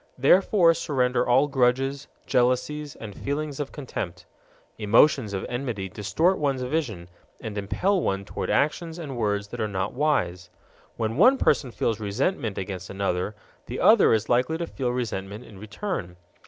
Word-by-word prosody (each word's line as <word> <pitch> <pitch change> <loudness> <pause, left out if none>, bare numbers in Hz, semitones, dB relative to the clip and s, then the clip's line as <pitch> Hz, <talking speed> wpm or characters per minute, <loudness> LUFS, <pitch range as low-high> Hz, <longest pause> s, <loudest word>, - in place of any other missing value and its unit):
Therefore 170 +5 +5
surrender 125 -5 0
all 130 +4 +5
grudges, 135 +1 +1 0.2
jealousies, 130 +4 0
and 105 -2 -8
feelings 145 0 -3
of 145 -2 -3
contempt. 90 - -6 0.5
Emotions 115 +2 +4
of 95 -1 -3
enmity 120 -6 -3
distort 135 - +1
one's 135 -3 0
vision 125 - -2 0.3
and 110 -2 -6
impel 180 - 0
one 100 -5 -1
toward - - -4
actions 160 +3 0
and 150 -6 -6
words 105 -3 -1
that - - -5
are 110 - 0
not 95 -1 -3
wise. 90 - 0 0.5
When 115 +1 -2
one 250 - +6
person 145 - +2
feels 115 0 -1
resentment 110 - -1
against 95 -1 -5
another, 95 +1 -2 0.3
the - - -5
other - - +6
is 110 -1 +2
likely 125 +6 +2
to 170 - -3
feel 130 -6 -3
resentment 110 -3 -4
in 100 -3 -13
return. 105 - -5
125 Hz, 155 wpm, -25 LUFS, 100-145 Hz, 0.5 s, one